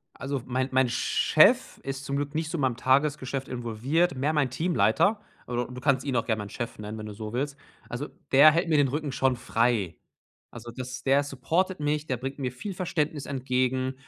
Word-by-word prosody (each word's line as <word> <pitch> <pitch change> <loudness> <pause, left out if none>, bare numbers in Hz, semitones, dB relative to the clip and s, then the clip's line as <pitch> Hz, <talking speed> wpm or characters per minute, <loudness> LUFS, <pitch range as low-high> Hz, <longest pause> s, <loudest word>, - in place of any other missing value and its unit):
Also, 135 -1 -4
mein 130 +1 -1
mein 130 -1 +3
Chef 120 - +3
ist 135 0 -5
zum 140 - -2
Glück 145 +1 -3
nicht 160 0 -2
so 170 - -2
in - - -1
meinem 130 -3 +1
Tagesgeschäft 135 0 +1
involviert, 125 +8 0
mehr 145 +4 0
mein 145 -4 +1
Teamleiter, 165 - +2 0.3
aber 120 0 -2
d 125 - -11
du 125 - -7
kannst 135 -1 +2
ihn 135 -3 -1
auch 115 - 0
gern 110 -2 0
meinen 105 -1 -6
Chef 120 -2 -5
nennen, 105 +1 -6
wenn 110 - -6
du 105 - -6
so 110 +1 -7
willst. 140 +3 -2 0.3
Also, 125 +5 -4 0.2
der 145 +3 +9
hält 170 +3 0
mir 155 - +3
den 145 -2 +4
Rücken 145 +1 -3
schon 130 -1 +1
frei. 115 -6 0 0.6
Also 120 0 -9
das 125 -1 -6
der 140 +1 +4
supportet 165 +8 -1
mich, 150 +1 -1
der 130 - 0
bringt 135 +2 -5
mir 130 -2 -1
viel 190 +10 -6
Verständnis 155 -5 -2
entgegen, 130 -1 -1
130 Hz, 210 wpm, -27 LUFS, 125-145 Hz, 0.6 s, der